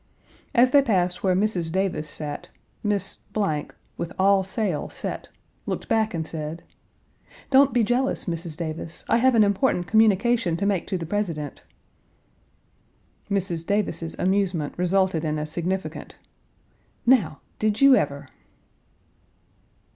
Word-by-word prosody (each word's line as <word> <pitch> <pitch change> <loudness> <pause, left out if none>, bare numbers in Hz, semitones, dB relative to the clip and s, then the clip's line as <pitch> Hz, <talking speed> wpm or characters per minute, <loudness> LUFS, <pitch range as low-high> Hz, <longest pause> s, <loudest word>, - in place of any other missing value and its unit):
As 250 +1 +5
they 285 - +7
passed 180 -8 0
where 185 -2 +2
Mrs. 185 -4 0
Davis 185 -4 -1
sat, 145 0 -5 0.3
Miss, 205 -2 -1 0.8
with 170 - -4
all 195 0 +4
sail 190 -3 -2
set, - - -6 0.4
looked - - -3
back 220 -3 +1
and 160 -1 -2
said: 160 +1 -5 0.9
"Don't 270 +1 +6
be 240 -2 +2
jealous, 245 +4 0
Mrs. 165 -2 -4
Davis; 165 0 -6
I - - +3
have 255 +1 +4
an 220 - +6
important 200 -2 +1
communication 220 -1 +3
to 200 - -1
make 200 -4 0
to 190 - -1
the 165 - -5
President." 165 -6 -3 1.7
Mrs. 185 -5 -1
Davis's 170 -4 -1
amusement 185 -5 0
resulted 180 -2 +1
in 155 -1 -1
a 150 - -2
significant 175 +5 -4 0.9
"Now! 230 - +3 0.2
Did 215 0 +1
you 275 -1 +7
ever?" 140 - -1
190 Hz, 125 wpm, -24 LUFS, 165-215 Hz, 1.7 s, they